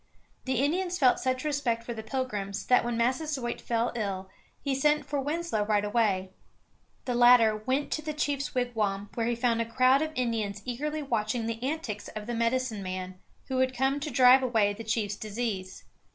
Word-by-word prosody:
The 260 0 0
Indians 360 +4 0
felt 255 -6 +4
such 255 0 -1
respect 270 -6 0
for 235 - -5
the 220 - -6
Pilgrims 215 -5 -3
that 250 - +4
when 240 -1 -2
Massasoit 255 +1 -1
fell 235 0 0
ill 195 -4 -3 0.3
he 280 - -2
sent 295 +3 +2
for 290 - -2
Winslow 300 -4 -1
right 205 -1 +1
away. 205 -4 +1 0.7
The 250 - -1
latter 240 -2 +6
went 260 +7 -1
to 310 - -1
the 310 0 -4
chief's 285 -2 -2
wigwam, 210 -5 -1
where 230 -1 -1
he 240 - +1
found 235 -1 +1
a 230 0 -4
crowd 255 +3 +4
of 315 0 -1
Indians 220 -5 -2
eagerly 300 +5 -3
watching 230 -2 -1
the 230 0 -4
antics 260 -7 -3
of 215 -1 -5
the 240 - -4
medicine 230 -1 0
man, 185 0 -5 0.3
who 260 -1 -1
had 260 -1 +1
come 270 +2 +1
to 300 +1 -4
drive 255 0 +6
away 220 -5 +2
the 225 +3 -8
chief's 215 -2 -1
disease. 210 -4 -4
240 Hz, 185 wpm, -28 LUFS, 215-265 Hz, 0.7 s, latter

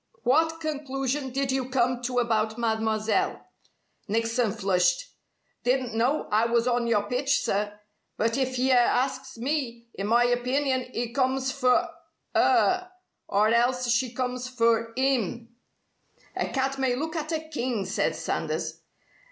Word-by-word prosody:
"What 320 +5 +2
conclusion 280 -3 -2
did 270 +1 -1
you 260 -1 -1
come 250 -1 +1
to 250 0 -2
about 225 -2 +1
Mademoiselle?" 220 - 0 0.6
Nickson 230 +1 +1
flushed. 180 -2 +1 0.5
"Didn't 250 -1 +1
know 245 +7 +1
I 220 +2 +3
was 235 +1 +1
on 240 -1 +1
your 215 -3 +2
pitch, 260 +6 0
sir. 205 +1 -2 0.4
But 230 +1 +1
if 260 -1 -1
yer 260 +1 +3
asks 260 +1 +1
me, 235 -3 -3
in 195 - -4
my 235 +2 +4
opinion 255 +2 0
'e 235 0 -2
comes 265 0 +1
for 255 -2 +2 0.5
'er. 365 -1 +3 0.4
Or 210 +2 +3
else 245 +2 +2
she 240 +1 +1
comes 250 0 -3
for 230 -2 +2
'im." 240 -4 0 0.9
"A - - -1
cat 270 0 -1
may 260 -2 +1
look 315 +5 -4
at 310 0 -3
a 320 - 0
king!" 250 -9 -2
said 190 +4 0
Sanders. - - -3
250 Hz, 140 wpm, -26 LUFS, 230-270 Hz, 0.9 s, my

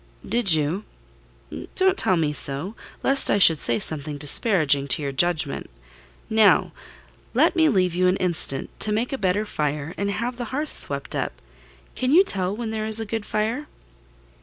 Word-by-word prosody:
"Did 225 -5 +4
you? 160 +6 0 0.9
Don't 380 0 +2
tell 185 - +1
me 155 -2 -1
so—lest 185 - 0
I - - +2
should 165 -6 +8
say 120 - +1
something 150 -1 -4
disparaging 145 -2 +3
to 140 - 0
your 140 - -3
judgment. 155 0 0 0.6
Now, 220 -2 +3 0.6
let - - +2
me 320 -2 +3
leave 185 - 0
you 180 +1 +1
an 185 - +1
instant, 170 -6 -1
to 215 - +3
make 225 +5 -2
a - - -2
better 200 +2 -1
fire, 150 -3 -4
and 200 0 -2
have 235 +4 -4
the 245 - -5
hearth 290 +6 -5
swept - - 0
up. - - -3 0.6
Can 255 0 -2
you 365 +4 +6
tell 190 - -3
when 225 0 -5
there 215 -1 -4
is 220 0 +2
a 225 - -4
good 220 0 -5
fire?" 225 +8 -3
195 Hz, 170 wpm, -22 LUFS, 155-225 Hz, 0.9 s, should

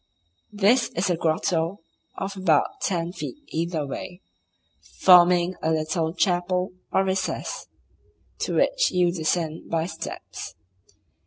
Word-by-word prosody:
This 230 +5 +3
is 180 +2 +1
a - - +2
grotto 165 +2 0 0.4
of 195 +1 -4
about 175 -6 +1
ten 170 -2 -1
feet 185 - -6
either 165 -2 -2
way, 175 +6 -7 0.8
forming 180 -1 +6
a 160 - 0
little 160 +1 0
chapel 180 0 +1 0.2
or 190 - +3
recess, 190 -1 -2 0.7
to - - -2
which - - +3
you 180 -1 +2
descend 160 -1 -2
by 165 -1 0
steps. 165 -1 -7
175 Hz, 115 wpm, -25 LUFS, 165-185 Hz, 0.8 s, forming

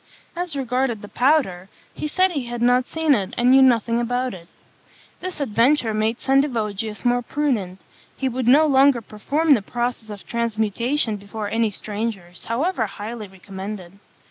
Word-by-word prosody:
As 350 -3 -1
regarded 250 -4 -1
the - - -7
powder, 225 - +1 0.2
he 300 - -4
said 370 +4 +2
he 280 -7 -3
had 240 0 -5
not 250 +1 +3
seen 320 -2 +2
it, 205 -2 -1
and 245 +1 +4
knew 270 +1 +7
nothing 235 -2 +3
about 245 +1 -1
it. 170 -2 -11 0.7
This 370 -3 -6
adventure 240 -1 +2
made 215 +2 0
Sendivogius 225 -6 0
more 245 0 +3
prudent; 235 -10 -2 0.4
he 265 - -1
would 255 -1 -2
no 290 +5 +6
longer 270 -3 +4
perform 285 +9 +1
the 235 - +2
process 240 +1 -3
of 205 -2 -9
transmutation 230 +2 0
before 205 +1 -6
any 225 -1 +1
strangers, 205 -4 -5
however 245 - 0
highly 210 +2 -7
recommended. 190 0 -9
235 Hz, 155 wpm, -22 LUFS, 210-270 Hz, 0.7 s, knew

